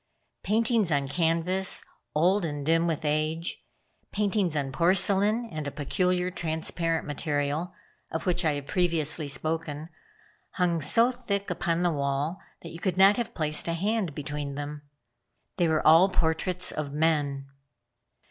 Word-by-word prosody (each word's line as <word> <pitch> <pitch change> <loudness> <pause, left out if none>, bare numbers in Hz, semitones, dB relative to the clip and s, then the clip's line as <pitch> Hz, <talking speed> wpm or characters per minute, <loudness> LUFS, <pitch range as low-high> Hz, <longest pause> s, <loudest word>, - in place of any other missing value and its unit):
Paintings 220 -3 +1
on 140 -2 +1
canvas, 170 +5 +1 0.3
old 180 +6 +3
and 145 -3 -4
dim 165 +2 +2
with 160 -1 -2
age; 155 +3 -2 0.5
paintings 200 -5 0
on 140 -2 -2
porcelain, 195 - +3
and 155 -2 -4
a - - -3
peculiar 180 +5 -1
transparent 165 0 -2
material, 145 +2 -2 0.4
of 160 0 -4
which 180 0 +1
I 155 -2 +2
have 145 -1 -5
previously 160 -3 +1
spoken, 155 +1 -2 0.6
hung 175 -3 0
so 230 - +4
thick 200 -5 -3
upon 170 0 -1
the 175 - +2
wall 140 +5 -2 0.2
you 165 0 -9
could 180 +1 -2
not 195 +2 +6
have 240 - -4
placed 155 -1 0
a 170 - 0
hand 195 -3 -1
between 145 -1 -5
them. 145 +1 -6 0.8
They 175 -3 +2
were 160 -1 0
all 165 +5 +7
portraits 180 +1 0
of 150 -2 -4
men. 145 -3 0
165 Hz, 140 wpm, -27 LUFS, 150-180 Hz, 0.8 s, all